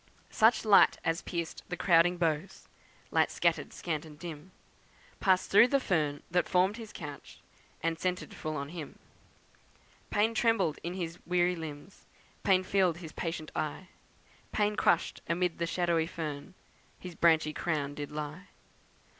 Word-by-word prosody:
Such 220 +1 +4
light 205 -2 +6
as 165 +1 0
pierced 170 -2 -4
the 175 - -3
crowded 175 0 +4
boughs 165 +1 -2 0.4
(Light - - +3
scattered, - - 0
scant 155 -4 -3
and 155 -2 -12
dim,) 165 0 -8 0.7
Passed 185 -1 +2
through 210 +5 +8
the 275 +2 +2
fern 150 - 0
that 180 +1 +1
formed 190 +4 +2
his 225 -2 -9
couch 145 -3 -9 0.4
And 165 0 -1
centred 180 0 -2
full 155 0 -4
on 140 0 -4
him. 160 -3 -8 1.1
Pain 220 +2 +2
trembled 220 -9 +2
in 175 +2 -4
his 175 -2 -5
weary 180 0 +2
limbs, 160 +2 -9 0.3
Pain 185 -1 +3
filled 185 -3 +2
his 165 -3 -9
patient 165 -2 -4
eye, 155 +4 -3 0.6
Pain 210 0 +1
crushed - - +1
amid 175 0 0
the 170 - 0
shadowy 170 -2 +1
fern 155 0 -6 0.4
His 180 -1 -9
branchy 160 -2 +3
crown 150 -4 -2
did 145 0 -6
lie. 150 +5 -6
170 Hz, 145 wpm, -30 LUFS, 155-185 Hz, 1.1 s, through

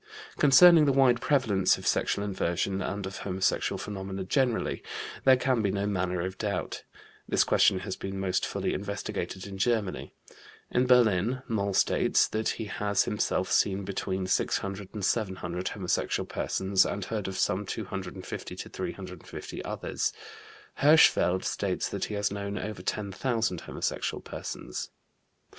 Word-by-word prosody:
Concerning 155 +3 +8
the 140 - +4
wide 130 -2 +4
prevalence 110 -10 +3
of - - -10
sexual 100 - +1
inversion 95 0 -1
and 100 +1 -3
of 95 0 -6
homosexual 95 -1 0
phenomena 95 -1 -5
generally, 125 +4 0 0.4
there 130 -1 +7
can 130 -2 +1
be 100 - +1
no 100 +1 -1
manner 90 -3 -1
of 95 +2 -5
doubt. 100 -4 -2 0.5
This - - +4
question 95 - +3
has 95 -1 -4
been 95 0 -5
most 95 -1 0
fully - - -1
investigated 100 -1 -4
in 95 -1 -8
Germany. 110 -3 0 0.6
In 125 +1 +2
Berlin, 120 0 +3
Moll 100 -3 -1
states - - +3
that 110 0 -1
he 110 - -4
has 100 -1 0
himself 105 - -1
seen 100 0 +2
between 95 -1 -2
600 95 +1 -1
and 105 -3 -3
700 95 -5 -1
homosexual 95 -4 -1
persons 95 0 +1
and 100 -2 -3
heard 105 -2 -3
of 95 -1 -4
some 95 +3 +1
250 95 -3 -6
to - - -7
350 - - -7
others. - - -2 0.7
Hirschfeld 140 - +5
states - - -1
that - - -2
he 105 - -5
has 100 -1 0
known 100 0 -4
over 105 -4 -5
10,000 105 0 -1
homosexual - - -3
persons. - - -6
100 Hz, 145 wpm, -28 LUFS, 95-110 Hz, 0.7 s, Concerning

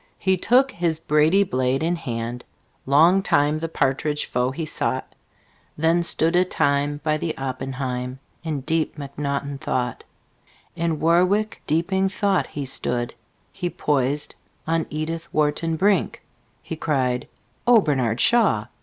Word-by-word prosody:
He 190 0 +2
took 255 +8 +3
his 170 -2 -1
brady 160 +5 +3
blade 130 -4 0
in 170 +2 +1
hand; 120 -5 -4 0.4
Long 165 +8 +5
time 150 -3 +2
the 165 +1 -3
partridge 145 +1 0
foe 125 +1 0
he 155 +5 -4
sought. 130 -3 -2 0.6
Then 165 +3 +3
stood 165 0 +1
a 180 - +5
time 145 -3 0
by 155 -1 +1
the 160 +1 -3
oppenheim 130 -1 -4 0.3
In 155 -4 -3
deep 160 +2 -1
mcnaughton 140 0 -4
thought. 125 -2 -2 0.7
In 165 -2 -1
warwick 185 +6 +2
deeping 190 +5 +1
thought 195 -1 +1
he 145 -2 -5
stood 120 -2 -2 0.4
He 180 -2 -3
poised 145 -2 -1 0.3
on 165 0 0
edithwharton 160 0 -1
brink; 195 +1 +1 0.4
He - - -5
cried, 130 -6 -1 0.4
"Ohbernardshaw! 140 - +3
155 Hz, 125 wpm, -23 LUFS, 135-170 Hz, 0.7 s, Long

